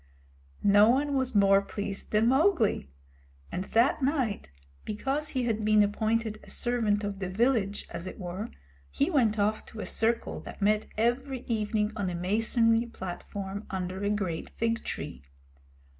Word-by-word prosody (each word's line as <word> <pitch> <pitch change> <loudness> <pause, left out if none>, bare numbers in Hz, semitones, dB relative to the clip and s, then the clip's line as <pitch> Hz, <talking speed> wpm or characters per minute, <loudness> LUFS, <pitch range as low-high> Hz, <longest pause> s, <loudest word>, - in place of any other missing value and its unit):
No 205 +2 +6
one 280 +4 +2
was 260 -3 0
more 195 -1 +6
pleased 200 0 -5
than 215 +2 +3
Mowgli; 265 - +2 0.6
and 185 - -3
that 235 +8 +2
night, 260 - 0 0.3
because 270 +8 -2
he 255 -2 -1
had 220 -2 0
been 215 0 +5
appointed 220 +1 0
a - - -14
servant 225 -4 0
of 200 -1 -3
the 190 -2 -3
village, 210 -1 +1
as 175 - -5
it - - -7
were, 185 +5 -5 0.4
he 285 +6 0
went 230 -8 +3
off 210 +1 +1
to 225 - -10
a - - -3
circle 230 +1 0
that - - -10
met 210 +1 +2
every 250 +3 0
evening 215 -2 -1
on 200 -4 -1
a 175 - -3
masonry 225 +5 +2
platform 195 0 -6
under 185 +1 -3
a 200 - +1
great 190 -6 -2
fig 230 0 -1
tree. 65 - -5
215 Hz, 160 wpm, -29 LUFS, 200-235 Hz, 0.6 s, No